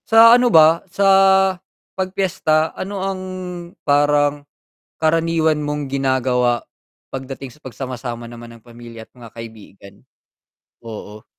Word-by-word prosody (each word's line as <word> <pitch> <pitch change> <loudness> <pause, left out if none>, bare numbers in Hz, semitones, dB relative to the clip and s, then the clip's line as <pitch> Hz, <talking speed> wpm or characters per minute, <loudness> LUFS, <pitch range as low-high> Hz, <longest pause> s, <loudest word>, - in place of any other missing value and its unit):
Sa 225 +1 +8
ano 245 0 +4
ba, 160 -3 +5
sa 195 +3 -1 0.9
'pag 190 -1 -3
piyesta, 160 -5 0
ano 200 +1 -6
ang 190 -1 -3 0.6
parang, 145 0 +2 0.6
karaniwan 160 -1 +2
mong 150 -2 -4
ginagawa 130 -3 0 0.5
pagdating 135 0 -7
sa 150 - -22
pagsama-sama 125 -3 -7
naman 120 0 -11
ng 115 - -21
pamilya 115 -1 -12
at - - -36
mga 120 -2 -13
kaibigan? 110 -4 -12 0.9
Oo. 110 -1 -9
140 Hz, 115 wpm, -19 LUFS, 120-160 Hz, 0.9 s, Sa